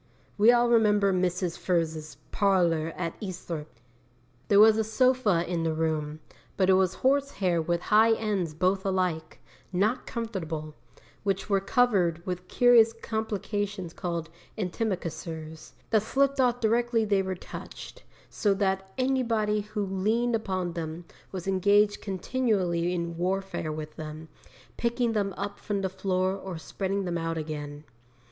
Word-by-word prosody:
We 215 +3 +6
all 240 0 +4
remember 210 -4 +4
Mrs. 180 -1 -1
Furze's 160 -3 -1
parlour 170 -5 +2
at 170 -2 -2
Eastthorpe. 165 - -6 0.7
'There 200 - +5
was 220 +1 +7
a - - +3
sofa 220 -6 +2
in 175 -1 -1
the 160 -1 0
room, 155 -1 -2 0.4
but 190 -1 +4
it - - +6
was 185 -1 +2
horse 280 +1 +3
hair 175 -4 +1
with 170 +1 -1
high 225 +2 +6
ends 200 -8 -1
both 185 +3 +1
alike, 180 -5 -1 0.3
not 205 +7 0
comfortable, 165 -10 -4 0.5
which 195 +1 -2
were 195 - +4
covered 195 -6 +2
with 180 0 -4
curious 235 -1 +5
complications 205 -4 -3
called 170 -3 -4 0.3
antimacassars, 165 -5 -4 0.2
that 220 -2 +4
slipped 275 +5 +1
off 245 -1 +2
directly 235 0 +2
they 200 -2 +2
were 190 0 -3
touched, - - -10 0.3
so 205 -2 +1
that 190 -1 -1
anybody 230 -5 +1
who 210 0 -3
leaned 215 +6 0
upon 185 -5 -2
them 165 0 -5 0.3
was 185 -1 -6
engaged 205 +2 +3
continually 190 -4 0
in 170 -1 -3
warfare 185 -2 -2
with 155 0 -7
them, 155 0 -7 0.5
picking 235 0 0
them 200 -2 0
up 200 0 -4
from 205 -2 -2
the 190 - 0
floor 185 0 0
or 190 -3 -6
spreading 195 +4 -3
them 175 -1 -2
out 165 0 -2
again. 150 -2 -5
190 Hz, 140 wpm, -27 LUFS, 170-215 Hz, 0.7 s, was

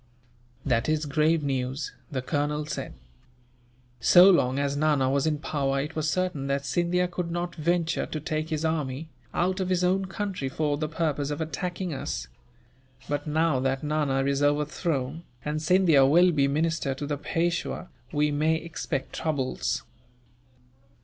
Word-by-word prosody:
"That 115 - +1
is 155 0 +1
grave 155 +2 +2
news," 135 0 -2 0.2
the 130 -3 -2
colonel 150 +2 -1
said. 140 -2 -5 1.0
"So 180 +9 +8
long 130 -7 +2
as 140 0 0
Nana 145 -3 +2
was 140 +2 +1
in 155 -1 +1
power, 140 -2 -1
it 150 +3 -4
was 155 -1 0
certain 180 -6 -1
that 140 0 -1
Scindia 175 +3 +1
could 175 -1 -4
not 175 +1 -3
venture 170 +1 0
to 155 - -4
take 155 +1 -3
his 155 0 -1
army, 155 -1 -2 0.2
out 185 +2 0
of 185 -1 -1
his 180 -1 +1
own 190 +2 +2
country 190 -7 -3
for 150 +1 0
the 155 +1 -3
purpose 150 -3 -1
of 145 - -3
attacking 170 +3 -3
us; 65 - -4 0.8
but 145 +1 -2
now 155 -2 +2
that 135 +1 -1
Nana 145 -3 +1
is 140 0 +1
overthrown, 145 0 0 0.2
and 150 +1 -2
Scindia 165 -4 +5
will 175 +5 +6
be 140 -4 +2
minister 155 -1 0
to 145 - -5
the 145 0 -2
Peishwa, 170 +3 -1 0.2
we 150 0 +1
may 155 +2 +2
expect 160 -4 -4
troubles." 145 -5 -1
150 Hz, 155 wpm, -27 LUFS, 140-165 Hz, 1.0 s, So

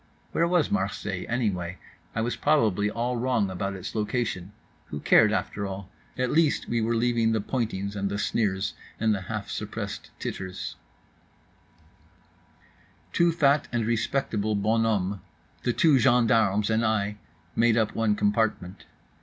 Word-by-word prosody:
Where 170 - +2
was 175 -1 +2
Marseilles 105 - -2
anyway? 95 -7 -1 0.4
I 115 - 0
was 120 +2 -1
probably 110 -9 +2
all 120 +3 -2
wrong 115 -5 +1
about 100 +2 -3
its 95 - -6
location. 105 -3 -2 0.4
Who 75 - -5
cared, - - +5
after 100 -1 -2
all? 95 0 -7 0.3
At 125 0 0
least 160 -1 +2
we 115 -1 0
were 115 +1 +1
leaving 115 -1 +2
the 110 - +1
pointings 100 -3 -2
and 100 -1 -1
the 100 - -2
sneers 100 -2 0 0.3
and 110 -1 +3
the 100 - -2
half 105 +2 -5
suppressed - - -5
titters…. 95 -1 -5 2.4
Two 170 0 +4
fat 145 -3 +3
and 120 -2 0
respectable 110 -2 0
bonhommes, 105 -2 +1 0.4
the 120 - +1
two 155 -2 +4
gendarmes, 115 -4 +3
and 110 +1 +2
I, 105 -2 0 0.4
made 115 0 +4
up 110 -2 +1
one 110 -2 +1
compartment. 105 -4 0
110 Hz, 140 wpm, -27 LUFS, 100-120 Hz, 2.4 s, cared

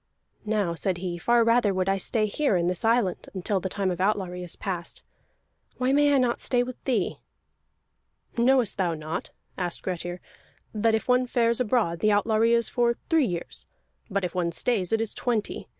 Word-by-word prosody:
"Now," 205 -5 0
said 180 +2 -1
he, 175 -1 -4
"far 235 +4 +3
rather 230 -4 +3
would 185 0 0
I 195 0 +2
stay 215 +3 0
here 215 +2 0
in 170 - 0
this 180 0 -1
island, 225 -5 +1
until 190 +2 -1
the 190 - -4
time 195 -1 -1
of 180 0 -4
outlawry 190 -3 0
is 175 -1 -3
past. 175 -3 -5 0.7
Why 255 +1 +1
may 290 0 +4
I 280 - +4
not 250 -2 +1
stay 245 -1 +1
with 250 0 -8
thee?" 235 -8 0 1.2
"Knowest 245 -3 +2
thou 175 -3 +1
not," 155 +1 -5 0.3
asked 175 -2 -2
Grettir, 175 -1 -4 0.5
"that 220 +1 +2
if 220 - -3
one 250 0 +3
fares 235 -1 +1
abroad 215 -8 +1
the 215 - +3
outlawry 220 +2 +3
is 235 -1 +2
for 235 -1 +1 0.2
three 320 -6 +4
years, 175 -3 -6 0.4
but 200 -1 -1
if 180 - -2
one 175 -2 0
stays 190 0 -1
it 225 0 +2
is 225 - -2
twenty? 230 -4 -2
210 Hz, 185 wpm, -26 LUFS, 180-235 Hz, 1.2 s, may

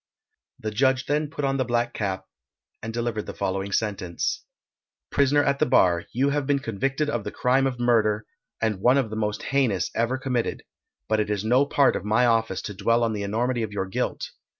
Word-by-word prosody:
The 110 - -4
judge 130 +4 +2
then 150 0 0
put 145 -2 -3
on 135 0 +1
the 130 - +1
black 120 0 0
cap, 95 -3 -3 0.6
and 110 - -5
delivered 115 -2 -3
the - - -6
following 95 +1 -2
sentence: 100 -5 -2 0.7
Prisoner 145 +1 +3
at 140 0 +1
the - - +3
bar, 90 -9 +3
you 135 +4 +1
have 145 -1 -1
been 145 -1 +3
convicted 135 +4 -1
of 120 -7 -2
the 105 - -4
crime 130 +5 +2
of 125 -2 -4
murder, 110 -3 +2 0.3
and 110 -4 -1
one 125 +5 +5
of 125 -6 0
the - - -4
most 105 -1 -2
heinous 120 -11 +1
ever 120 +3 0
committed, 125 -3 -2 0.4
but 110 0 +1
it 105 -1 0
is 105 0 -1
no 130 +5 +3
part 140 -1 +3
of - - -3
my 110 +4 +3
office 115 -5 +1
to 105 - -5
dwell 115 +4 +2
on 115 -1 +1
the 105 - -3
enormity 120 +4 -1
of 110 -2 -3
your 100 -2 -1
guilt. 95 - -3
115 Hz, 205 wpm, -25 LUFS, 105-130 Hz, 0.7 s, one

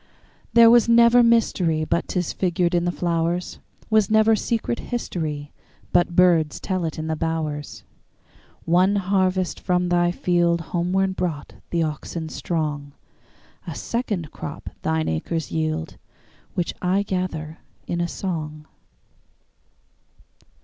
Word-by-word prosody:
There 230 0 +8
was 235 -1 +5
never 235 +1 +6
mysteryBut 180 -9 +2
'tis 180 -3 -2
figured 175 -1 0
in 175 0 +2
the 175 - +1
flowers; 170 0 -1 0.3
SWas 215 -2 +4
never 220 +1 +5
secret 230 +2 -2
historyBut 160 - -3
birds 170 -3 +3
tell 185 -3 -2
it 160 - -4
in 155 - -4
the 160 0 -1
bowers. 155 -2 -3 0.8
One 185 +4 +3
harvest 185 -2 0
from 180 -1 0
thy 175 0 +3
fieldHomeward 175 +2 0
brought 165 -6 -3 0.2
the 170 -1 +1
oxen 160 +1 -4
strong;A 150 -5 -6
second 205 - -3
crop 145 +1 -7
thine 160 0 0
acres 160 - -2
yield, 160 0 -2 0.6
Which 175 -3 -1
I 190 +2 +1
gather 170 -5 -4 0.3
in 170 0 -2
a 170 - 0
song. 155 -5 -5
175 Hz, 115 wpm, -23 LUFS, 160-190 Hz, 0.8 s, There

